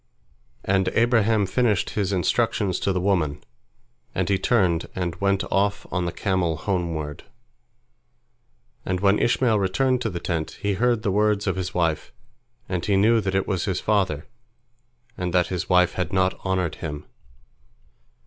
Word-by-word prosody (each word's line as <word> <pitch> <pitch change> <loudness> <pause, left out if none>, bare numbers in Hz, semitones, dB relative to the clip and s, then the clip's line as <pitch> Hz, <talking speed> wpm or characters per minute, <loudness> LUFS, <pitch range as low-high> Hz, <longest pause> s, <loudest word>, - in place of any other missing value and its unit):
And 95 0 +2
Abraham 115 -3 +3
finished 105 -1 +1
his 100 -2 -1
instructions 95 +1 0
to 100 - 0
the 90 - 0
woman, 85 -7 0 0.7
and - - 0
he 100 -1 +2
turned 95 -7 +2
and 90 -3 -2
went 100 +1 +1
off 100 +1 +1
on 90 -2 0
the 85 - -2
camel 90 -5 -1
homeward. 80 -5 -3 1.6
And 90 0 -2
when 100 +1 +3
Ishmael 115 -2 +2
returned 125 +7 +1
to - - -1
the 85 - -5
tent, 80 -3 -3
he 100 0 0
heard 120 +2 +1
the 100 - +1
words 105 0 +2
of 95 -3 0
his 95 -1 -4
wife, 85 -3 0 0.6
and 90 -2 -2
he 100 - +1
knew 110 +3 +4
that 95 -1 -2
it 95 - 0
was 95 -3 -1
his 95 -3 -1
father, 95 -8 0 0.9
and 90 0 -2
that 90 -1 +3
his 90 -1 -3
wife 90 -1 +4
had 90 -3 -3
not 95 0 +2
honored 95 -3 -1
him. 75 -2 -5
95 Hz, 160 wpm, -24 LUFS, 90-100 Hz, 1.6 s, knew